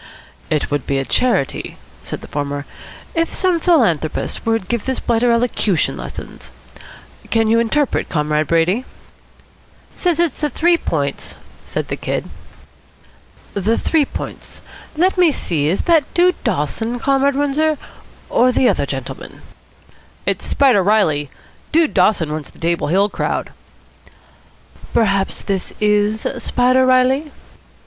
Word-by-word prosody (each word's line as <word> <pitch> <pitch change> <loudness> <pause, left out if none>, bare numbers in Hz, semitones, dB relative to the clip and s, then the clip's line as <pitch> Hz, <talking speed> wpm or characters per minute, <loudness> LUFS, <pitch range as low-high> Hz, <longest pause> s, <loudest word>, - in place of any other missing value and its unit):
"It 155 -2 -1
would 145 -2 -2
be 140 - 0
a 135 - -1
charity," 235 - 0 0.2
said - - -6
the - - -10
former, 145 0 -3 0.5
"if 330 -1 -1
some 365 -3 +1
philanthropist 225 - +1
would 225 -4 0
give 235 -3 -2
this 260 -1 -1
blighter 235 +1 +2
elocution 230 -6 +1
lessons. - - -8 0.8
Can 225 -1 +2
you 225 +1 +4
interpret, 270 +5 0
Comrade 150 -1 0
Brady?" 170 - +2 1.1
"Says 350 -3 0
it's 340 -5 0
the 300 - +1
Three 340 +6 +3
Points," 145 - -3 0.3
said - - -4
the - - -2
Kid. - - -3 1.3
"The 205 +3 0
Three 315 -3 +2
Points? - - -7 0.4
Let 365 +3 +2
me 350 -3 +6
see, 155 - -1
is 175 +5 0
that 330 -5 +2
Dude 360 +1 +3
Dawson, 225 - -1
Comrade 275 +2 +2
Windsor, 290 +2 +1 0.5
or 250 +1 +3
the 250 +1 +3
other 190 -10 +1
gentleman?" 135 -2 -7 0.8
"It's - - -1
Spider 260 -8 +4
Reilly. 175 -8 +2 0.4
Dude 320 -1 +3
Dawson 180 -5 +2
runs 155 -1 -4
the - - -20
Table 170 +1 0
Hill 195 +6 +3
crowd." - - -3 1.4
"Perhaps 195 -3 +1
this 195 -2 -3
is 210 +1 +1 0.2
Spider 255 +2 +3
Reilly?" 260 +4 +3
225 Hz, 130 wpm, -18 LUFS, 170-275 Hz, 1.4 s, me